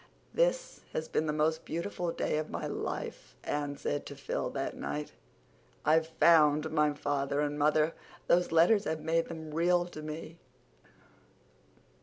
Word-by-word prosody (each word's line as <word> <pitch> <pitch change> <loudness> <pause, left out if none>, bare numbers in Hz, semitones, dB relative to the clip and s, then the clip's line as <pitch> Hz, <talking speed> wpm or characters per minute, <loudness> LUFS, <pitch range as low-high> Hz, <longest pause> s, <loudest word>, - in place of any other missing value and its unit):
"This - - +1
has 155 - -2
been 155 - 0
the - - +1
most 155 +2 +1
beautiful 170 +1 -3
day 155 - -1
of 155 - -4
my - - -4
life," - - -5
Anne 145 -1 -2
said 145 - -2
to 140 - -8
Phil 140 - -3
that 135 -1 -3
night. 150 0 -4 0.7
"I've 160 +1 +4
FOUND 160 -2 +4
my 150 -1 +3
father 145 -1 -1
and 145 0 -1
mother. 155 +2 +3 0.3
Those 180 +1 +3
letters 185 +6 +5
have 160 0 -2
made 165 +2 +1
them 160 -2 -7
REAL 175 +2 +3
to 155 - -8
me. 155 +2 -7
155 Hz, 150 wpm, -31 LUFS, 150-165 Hz, 0.7 s, letters